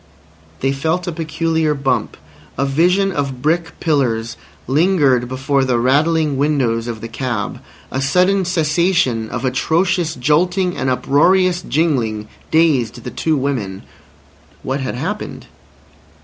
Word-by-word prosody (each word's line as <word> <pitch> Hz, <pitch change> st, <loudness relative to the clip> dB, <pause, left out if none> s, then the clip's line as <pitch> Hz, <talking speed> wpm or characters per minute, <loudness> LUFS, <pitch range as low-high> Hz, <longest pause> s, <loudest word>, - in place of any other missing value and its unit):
They 135 Hz, -, +1 dB
felt 160 Hz, +6 st, -1 dB
a 175 Hz, -, -2 dB
peculiar 160 Hz, -1 st, -1 dB
bump; 130 Hz, -5 st, -1 dB, 0.4 s
a 135 Hz, -, +1 dB
vision 180 Hz, +8 st, +2 dB
of 140 Hz, -5 st, -3 dB
brick 165 Hz, +2 st, 0 dB
pillars 120 Hz, -7 st, 0 dB, 0.3 s
lingered 140 Hz, -4 st, +2 dB
before 135 Hz, +2 st, 0 dB
the 130 Hz, -2 st, +1 dB
rattling 150 Hz, +4 st, +2 dB
windows 130 Hz, -6 st, +1 dB
of 115 Hz, -2 st, -5 dB
the 115 Hz, -, -5 dB
cab; 115 Hz, -3 st, -3 dB, 0.3 s
a 130 Hz, -, -2 dB
sudden 185 Hz, +8 st, +2 dB
cessation 160 Hz, -8 st, +1 dB
of 125 Hz, +2 st, -4 dB
atrocious 165 Hz, +5 st, +1 dB
jolting 180 Hz, +7 st, +1 dB
and 130 Hz, -, -1 dB
uproarious 175 Hz, +8 st, +3 dB
jingling 125 Hz, -11 st, 0 dB, 0.2 s
dazed 130 Hz, -8 st, +2 dB
the -, -, -6 dB
two 160 Hz, -2 st, 0 dB
women. 120 Hz, -9 st, -3 dB, 0.8 s
What 135 Hz, +2 st, -2 dB
had 130 Hz, -2 st, -3 dB
happened? 185 Hz, +12 st, -5 dB
145 Hz, 125 wpm, -18 LUFS, 125-165 Hz, 0.8 s, uproarious